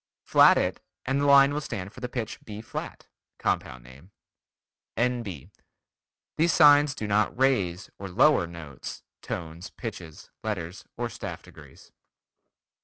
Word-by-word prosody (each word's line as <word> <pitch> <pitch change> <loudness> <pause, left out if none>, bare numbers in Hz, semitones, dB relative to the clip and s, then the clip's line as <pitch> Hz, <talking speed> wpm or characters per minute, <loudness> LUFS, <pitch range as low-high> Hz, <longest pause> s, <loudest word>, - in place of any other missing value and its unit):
Flat - - +6
it, - - -1 0.2
and 135 +2 0
the 145 - +2
line 140 0 +7
will 150 - -2
stand 100 -7 -6
for - - -11
the 125 -1 -5
pitch 120 -3 -4
B 105 -1 -8
flat. 110 - -7 0.3
(Compound 65 -2 -2
name.) 65 +8 -16 0.9
N.B. 115 - -2 0.9
These 165 +1 +3
signs 145 -1 +6
do 110 - -4
not 105 +2 +1
"raise" 105 -8 +1
or 100 0 -6
"lower" 115 - +4
notes, 80 -6 -9 0.2
tones, 85 +2 -6
pitches, 90 -9 -9
letters 95 -4 -4
or 120 0 -1
staff - - -7
degrees. - - -16
105 Hz, 135 wpm, -27 LUFS, 85-130 Hz, 0.9 s, line